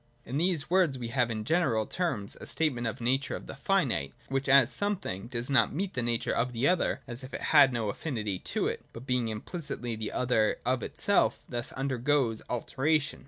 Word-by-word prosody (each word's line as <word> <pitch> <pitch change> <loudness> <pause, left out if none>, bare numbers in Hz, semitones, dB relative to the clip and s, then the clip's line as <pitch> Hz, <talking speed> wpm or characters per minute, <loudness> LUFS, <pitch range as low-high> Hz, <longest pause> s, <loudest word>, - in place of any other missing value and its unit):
In 130 +4 -3
these 170 -3 +1
words 175 -6 +3
we 120 -2 -5
have 120 -1 +1
in 110 -2 -3
general 140 -8 +2
terms 115 - -2
a - - -5
statement 130 -7 0
of 110 - -3
the - - -9
nature 135 +3 +1
of - - -8
the - - -8
finite, 135 - 0
which, 135 0 -1
as 135 -2 +6
some 205 0 0
thing, 95 - -6
does 120 0 -4
not 140 0 +3
meet 190 +3 -2
the 125 - -1
nature 120 -1 0
of 125 +1 0
the 120 +4 +1
other 180 0 +1
as 125 0 -6
if 130 - -7
it - - -5
had 145 -3 +8
no 115 -3 -1
affinity 105 - -3
to - - -2
it, - - -3
but, 115 +2 -9
being 125 -3 +1
implicitly 120 - -4
the 110 -1 -4
other 120 -4 +2
of 130 0 +1
itself, 140 - +1
thus 120 -2 -4
undergoes 130 -3 0
alteration. 145 +5 0
125 Hz, 210 wpm, -29 LUFS, 115-145 Hz, -, had